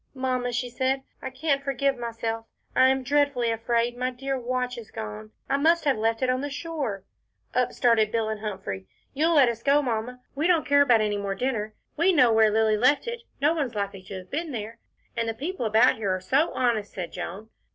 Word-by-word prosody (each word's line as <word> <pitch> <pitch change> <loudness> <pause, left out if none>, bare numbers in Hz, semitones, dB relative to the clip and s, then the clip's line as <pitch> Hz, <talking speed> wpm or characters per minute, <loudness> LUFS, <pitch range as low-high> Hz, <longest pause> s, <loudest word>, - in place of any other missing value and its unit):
"Mamma," 255 -1 -1
she 245 +1 -1
said, 260 +2 -1 0.2
"I 265 - -4
can't 275 +1 -1
forgive 275 0 0
myself, 230 -1 -4 0.3
I 260 - +6
am 265 0 +1
dreadfully 280 -3 +2
afraid 235 +1 0
my 250 +1 -1
dear 270 +2 -3
watch 250 0 -2
is 220 - -11
gone. 105 0 -7 0.2
I 275 - +1
must 330 +3 +3
have 280 -2 +3
left 225 +3 0
it 255 - +2
on 255 +1 -1
the 290 - -3
shore." 280 - -4 0.5
Up 250 0 +1
started 225 -3 +3
Bill 225 -1 0
and 215 -1 -3
Humphrey. 190 - -5 0.3
"You'll 320 +4 +2
let 275 -4 +6
us 230 -1 -2
go, 280 +3 +4
Mamma. 245 0 -3
We 300 +4 0
don't 345 -3 +3
care 285 0 +5
about 245 -5 +5
any 210 -1 0
more 200 -1 -3
dinner. 215 -2 -2 0.2
We 350 +4 +4
know 250 -7 +5
where 220 -1 +5
Lilly 220 0 +2
left 255 - +3
it 470 0 -4 0.2
no 295 +3 +3
one's 280 -8 -2
likely 200 -2 -3
to 190 0 -7
have 185 0 -11
been 320 +2 -3
there." 225 0 -6 0.4
"And 230 -1 -1
the 225 - -3
people 290 -1 -3
about 225 +4 +4
here 200 -4 0
are - - -4
so 270 - +1
honest," 230 -5 0
said 180 -3 -5
Joan. 195 +5 -7
245 Hz, 215 wpm, -26 LUFS, 220-275 Hz, 0.5 s, I